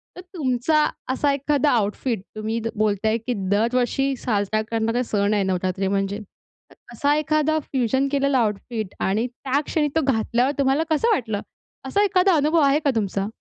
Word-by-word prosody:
तर 360 - -8
तुमचा 305 -3 0 0.3
असा 280 +2 +1
एखादा 285 +1 +1
आउटफिट 220 -1 0
तुम्ही 220 +2 -2 0.2
बोलताय 215 +1 +1
की 245 +2 -3 0.2
दरवर्षी 250 +5 +1
साजरा 215 -2 0
करणारे 230 +2 0
सण 205 -2 0
आहे 205 -2 +2
नवरात्री 185 0 -1
म्हणजे. 195 +1 -1
तर 210 - -20 0.2
असा 290 0 +1
एखादा 310 +1 +1
फ्युजन 265 -1 0
केलेला 280 -1 +2
आऊटफिट 215 -1 -2
आणि 215 +6 0
त्या 265 +3 -2
क्षणी 300 -2 0
तो 320 - +3
घातल्यावर 245 0 +1
तुम्हाला 275 +3 +2
कसं 315 +9 +2
वाटलं? 220 - -2 0.4
असा 400 +10 +1
एखादा 380 -3 +3
अनुभव 305 +3 +2
आहे 280 +1 +4
का - - +4
तुमचा? 200 -2 -1
250 Hz, 155 wpm, -23 LUFS, 215-285 Hz, 0.4 s, आहे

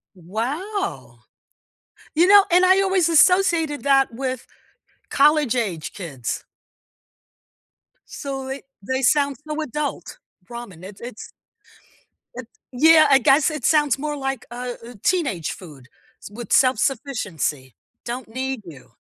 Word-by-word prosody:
Wow! 285 - -5 1.0
You 340 +3 +4
know, 405 0 +7
and 365 +1 +5
I 380 +1 +5
always 380 -3 +2
associated 330 -3 +3
that 270 -3 +3
with 260 0 -4 0.6
college-age 250 - +1
kids. 140 - -6 1.6
So 270 -2 -6
they 270 +1 -5 0.2
they 260 +6 -2
sound 280 0 +2
so 305 +1 -3
adult. 300 - -5 0.3
Ramen, 235 -8 -9
it's 195 +3 -11
it's 235 -2 -9 1.1
it 255 -2 -8 0.2
yeah, 310 +4 +6
I 270 - +6
guess 275 +5 +4
it 305 -1 -5
sounds 295 -3 +3
more 295 +1 -4
like 270 -1 -4
a 245 0 -5
a 240 0 -11
teenage 275 - 0
food, 145 -8 -13 0.3
s - - -10
with 230 +3 -10
self-sufficiency. 210 - 0 0.3
"Don't 240 +1 -5
need 260 +1 -4
you." 130 -6 -13
265 Hz, 120 wpm, -22 LUFS, 225-305 Hz, 1.6 s, know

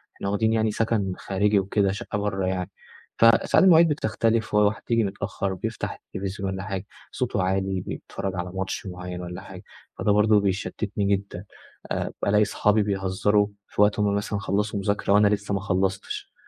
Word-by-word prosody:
إحنا 100 - -4
واخدين 110 +2 +1
يعني 110 -1 +2
سكن 105 -4 0
خارجي 100 +1 +1
وكده 100 0 +1
شقة 105 +1 -4
برّا 95 -2 -1
يعني 95 0 -2 0.5
فساعات 115 0 +5
المواعيد 170 -2 +7
بتختلف 115 -5 0
وحد 105 +1 +3
ييجي 115 -1 +3
متأخر 100 -1 -3
بيفتح 90 - -4 0.2
التلفزيون 95 0 -3
والّا 95 0 -4
حاجة 100 -1 -4 0.3
صوته 115 -7 -1
عالي 95 0 0
بيتفرج 95 -1 -5
على 90 0 -4
ماتش 95 +1 -3
معين 90 0 -6
والّا 90 0 -7
حاجة - - -11 0.4
فده 105 - +2
برضه 105 0 +5
بيشتتني 100 +1 -2
جدًا 100 -1 -8 0.5
آآ، - - -2 0.2
الاقي 105 +1 +4
اصحابي 105 +1 +2
بيهزروا 100 +1 +1 0.2
في - - -1
وقت 105 0 +4
هُم 100 -1 +2
مثلًا 100 0 -2
خلصوا 100 +1 -1
مذاكرة 100 0 0
وأنا 105 0 +6
لسه 100 0 -1
ما 100 - +1
خلصتش 95 -1 -2
100 Hz, 165 wpm, -25 LUFS, 95-105 Hz, 0.5 s, المواعيد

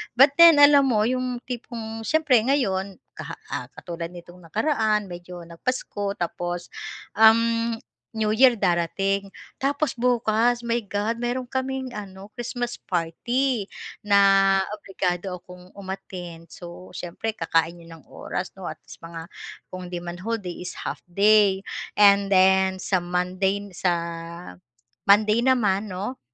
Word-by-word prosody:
but 275 +3 +7
then 335 -1 +10
alam 285 -1 +7
mo 215 -4 +2
yung 250 0 -1
tipong 225 -3 -6
siyempre 305 -7 +4
ngayon 195 -8 0 0.2
kaha - - -8 0.2
ah, - - -3
katulad 170 -1 -6
nitong 175 +1 -13
nakaraan 215 - 0
medyo 175 0 -9
nag-Pasko 200 +3 -3
tapos, 175 0 -4 0.4
um, 230 +1 +4 0.4
New 215 -1 0
Year 250 -2 +5
darating, 195 +3 0 0.2
tapos 285 +2 -1
bukas 240 -1 +2
my 235 -1 0
God, 205 +3 -2
meron 245 +1 -2
kaming 260 0 -3
ano, 195 -1 -8
Christmas 240 0 -4
party, 215 +7 -1 0.4
na 195 -1 +5 0.2
obligado 190 -2 -3
akong 180 +1 -15
umattend. 180 -4 -8
So 175 +1 -11
siyempre 180 +5 -4
kakain 165 -3 0
yun 165 - -15
ng - - -21
oras - - -5
no - - -6
at - - -5
least - - -13
mga 165 +1 -9 0.4
kung 185 -1 -7
'di 175 -1 -6
man 175 +1 -6
whole 230 +4 -2
day 180 -4 -7
is 180 - -6
half - - -4
day, 200 +1 +4 0.3
and 200 -1 +6
then 190 -1 +3
sa 185 - +1
Monday 180 +3 -1
n 200 - -12
sa 180 0 0 1.1
Monday 210 +2 +5
naman 215 -6 +2
'no, 205 +8 -5
200 Hz, 135 wpm, -24 LUFS, 180-235 Hz, 1.1 s, then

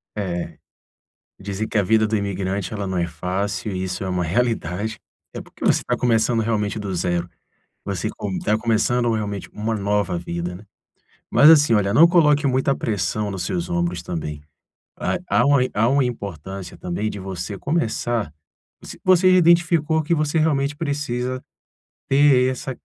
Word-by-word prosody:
É. 90 -4 -4 0.8
Dizer 100 +2 -4
que - - -2
a 100 - +3
vida 110 +2 +3
do 110 0 0
imigrante, 100 +1 -3
ela 100 -2 -3
não 95 -1 -3
é 85 0 0
fácil, 95 +5 -3
e 95 0 -3
isso 90 +1 -4
é 95 - -3
uma 90 -1 -1
realidade. 110 +1 -1 0.4
É - - -5
porque - - -12
você - - +3
está - - -1
começando 115 -1 +2
realmente 110 -1 -1
do 100 -3 -4
zero. 85 0 -1 0.6
Você 100 +2 -2
com 100 -4 -5
tá 105 +1 +1
começando 120 +1 +1
realmente 105 -3 -4
uma 110 +2 -2
nova 100 -3 0
vida, 85 +1 -4
né. 105 - -13 0.7
Mas 150 - +7
assim, 150 -6 +6
olha, 100 -1 +1
não 165 +3 +8
coloque 150 -4 +4
muita 135 +1 +2
pressão 105 0 -2
nos 95 -2 -4
seus 85 -1 -3
ombros 85 0 -1
também. 75 -4 -5 0.6
Há - - -1
há - - +3
uma 140 -2 +4
há 110 +3 +2
uma 135 0 +3
importância 95 -5 -6
também 95 +5 -3
de 105 - -6
você 95 +1 -5
começar 120 - -1 0.5
você - - -10
você 185 0 +5
já - - +6
identificou 165 -2 +3
que 155 +3 +1
você 155 0 0
realmente 145 -2 +1
precisa 130 -5 -3 0.7
ter 135 -2 +4
essa 130 +1 -5
105 Hz, 170 wpm, -22 LUFS, 95-130 Hz, 0.8 s, não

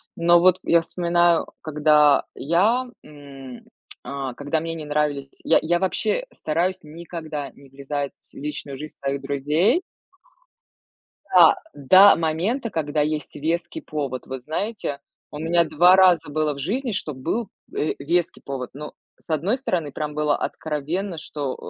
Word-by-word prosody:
Но 170 +1 +5
вот 185 +1 +5
я 170 0 +4
вспоминаю, 175 0 +2
когда 150 -2 +4
я, 205 - +2 0.2
м, 135 -4 -11 0.4
а, 135 -1 -5
когда 145 +4 -2
мне 165 +1 -4
не 155 -2 -7
нравились 145 -2 -1
Я 165 - +4
я 175 +2 +1
вообще 215 - -1
стараюсь 175 +4 -1
никогда 155 -2 -7
не 140 +1 -18
влезать 140 +1 -4 0.2
в - - -22
личную 145 -1 -6
жизнь 150 +2 -9
своих 140 0 -2
друзей. 155 - +1 1.5
Да, - - +8 0.2
до 190 +8 +7
момента, 175 - -1
когда 155 -5 -1
есть 150 -1 -2
веский 170 +3 -2
повод. 140 -4 -4
Вот 130 -1 -6
знаете, 160 - -3 0.3
у 150 - -7
меня 170 +2 +3
2 175 +3 +5
раза 180 -5 +4
было 155 0 0
в 140 - -10
жизни, 235 - -2
что 160 -6 -3
был, 195 - -3 0.3
э, 155 - 0
веский 170 +4 -1
повод. 130 -3 -5
Ну, 150 +2 -8 0.3
с - - -23
одной 165 - +1
стороны, 175 - -2
прям 150 +1 -4
было 150 -1 +1
откровенно, 160 +5 -3
что, 145 -3 -4
155 Hz, 145 wpm, -23 LUFS, 145-175 Hz, 1.5 s, Да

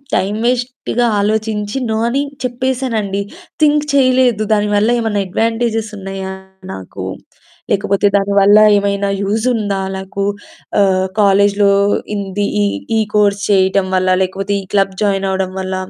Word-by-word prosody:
Time 200 +3 0
వేస్ట్‌గా 245 -1 -1
ఆలోచించి 215 +2 -1
no 220 - 0
అని 275 +3 0 0.2
చెప్పేసానండి. 245 -5 -2 0.4
థింక్ 300 -1 +4
చేయలేదు. 255 -5 +3
దానివల్ల 210 +1 +1
ఏమన్నా 210 -3 -1
అడ్వాంటేజెస్ 225 +1 -1
ఉన్నాయా 195 -1 -6 0.4
నాకు? 95 -1 -8 0.7
లేకపోతే 200 0 +1
దానివల్ల 200 +1 +4 0.2
ఏమైనా 200 0 0
యూజ్ 215 +4 -1
ఉందా 200 -3 -2 0.2
నాకు? 190 +1 -4 0.5
ఆహ్, 190 -1 +2
కాలేజులో 200 0 +3 0.4
ఇంది 200 0 -2 0.2
ఈ - - +2 0.3
ఈ - - +3 0.2
కోర్స్ 205 -1 +2
చేయటం 190 -1 +2
వల్ల, 185 0 +1
లేకపోతే 195 +2 -3
ఈ - - -11
క్లబ్ 195 -1 +2
జాయిన్ 195 -1 0
అవ్వడం 190 -1 -2
వల్ల. 190 0 -3
205 Hz, 125 wpm, -16 LUFS, 195-225 Hz, 0.7 s, థింక్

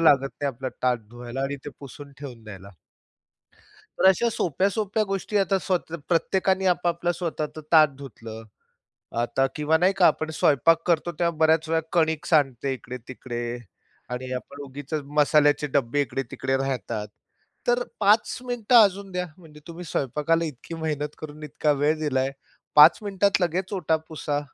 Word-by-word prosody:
लागत 140 -4 +5
नाही 145 - 0
आपला 130 0 -4
ताट 125 -2 +2
धुवायला 120 +2 -6
आणि 140 +1 -2
ते 145 - -6
पुसून 140 +1 -10
ठेवून 125 -6 -9
द्यायला. 100 -2 -10 1.3
तर - - +3
अशा 235 +5 +2
सोप्या-सोप्या 200 +6 0
गोष्टी 195 +2 -1
आता 195 0 +2
स्वतः 175 -3 -2
प्रत्येकाने 190 +2 +1
आपापलं 175 -1 +1
स्वतःच 160 -3 -4
ताट 155 -1 +8
धुतलं, 115 -5 -9 0.8
आता 135 +3 +1
किंवा 150 +1 +2
नाही 185 +2 +3
का 180 - +6
आपण 155 0 0
स्वयंपाक 160 +3 +3
करतो, 170 0 +1
तेव्हा 170 -2 +1
बऱ्याच 160 0 +3
वेळा 160 0 +2
कणीक 160 -2 +1
सांडते 135 -3 +2
इकडे-तिकडे 125 -1 -7 0.7
आणि 125 +1 -5
आपण 140 +3 -7
उगीचच 145 +3 -5 0.2
मसाल्याचे 150 0 +4
डब्बे 140 0 +1
इकडे-तिकडे 135 0 -2
राहतात, 120 -5 -3 0.6
तर 245 0 +3 0.2
5 210 +2 +3
मिनिट 245 -1 -2
अजून 200 -3 +5
द्या, 180 0 -2
म्हणजे 155 -4 -15
तुम्ही 170 +1 -8
स्वयंपाकाला 150 +4 0
इतकी 155 +3 -7
मेहनत 150 -2 -3
करून 155 0 -9
इतका 150 0 0
वेळ 155 +2 +3
दिलाय, 135 -3 0 0.4
5 150 +2 +8
मिनिटात 200 -1 +1
लगेच 185 +3 -1
ओटा 160 -4 +1
पुसा, 150 -2 -2
155 Hz, 145 wpm, -25 LUFS, 135-175 Hz, 1.3 s, ताट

